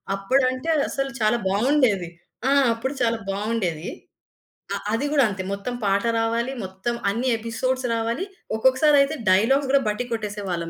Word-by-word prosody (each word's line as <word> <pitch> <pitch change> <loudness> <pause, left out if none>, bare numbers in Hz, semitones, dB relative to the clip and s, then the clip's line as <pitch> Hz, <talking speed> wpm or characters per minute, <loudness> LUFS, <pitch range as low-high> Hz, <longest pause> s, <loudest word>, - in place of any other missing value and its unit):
అప్పుడంటే 255 +8 0 0.2
అసలు 275 0 -2
చాలా 215 +2 +3
బావుండేది. 215 - +2 0.4
ఆ! - - +3 0.2
అప్పుడు 260 +4 -3
చాలా 230 -1 +2
బావుండేది. 195 -5 -2 0.9
ఆహ్, - - -6
అది 230 +6 0
గూడా 280 -3 +5
అంతే 190 -2 -4
మొత్తం 200 +5 -4
పాట 200 +2 +2 0.2
రావాలి. 230 +3 0
మొత్తం 190 +6 -4 0.2
అన్ని 240 +5 -1
ఎపిసోడ్స్ 250 +3 -2
రావాలి. 230 +10 -1 0.3
ఒక్కొక్కసారయితే 275 +4 +4 0.2
డైలాగ్స్ 265 +8 +3
గూడా 280 0 +4
బట్టి 210 +4 -2
కొట్టేసేవాళ్ళం 200 -6 -3
230 Hz, 135 wpm, -23 LUFS, 200-260 Hz, 0.9 s, గూడా